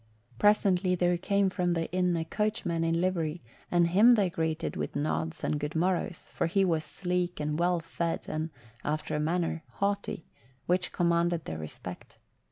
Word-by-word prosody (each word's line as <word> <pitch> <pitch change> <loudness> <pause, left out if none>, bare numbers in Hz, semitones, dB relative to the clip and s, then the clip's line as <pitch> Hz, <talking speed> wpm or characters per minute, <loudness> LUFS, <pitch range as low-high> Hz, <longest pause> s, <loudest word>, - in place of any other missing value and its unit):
Presently 195 -3 +4
there 175 0 +2
came 200 +2 +1
from 180 -1 +1
the 165 -1 -1
inn 180 -1 +2
a 160 - -2
coachman 190 -3 -1
in 165 0 +1
livery 170 -3 -1 0.3
and 175 -1 +4
him 210 +8 +6
they 195 -5 +2
greeted 160 -1 -2
with - - -4
nods 155 +2 -2
and 150 - 0
good 150 +1 -4
morrows, 175 0 -1
for - - 0
he 195 +3 +2
was 165 -3 +1
sleek 180 +1 -2
and 150 +1 -1
well 175 0 +2
fed 165 0 -3
and, 155 +1 -2 0.3
after 155 +1 -2
a - - 0
manner, 165 +1 0
haughty, 200 -3 -2 0.4
which 180 +1 +1
commanded 170 -1 +1
their 80 0 -5
respect. 80 -1 -8
175 Hz, 170 wpm, -29 LUFS, 160-185 Hz, 0.4 s, him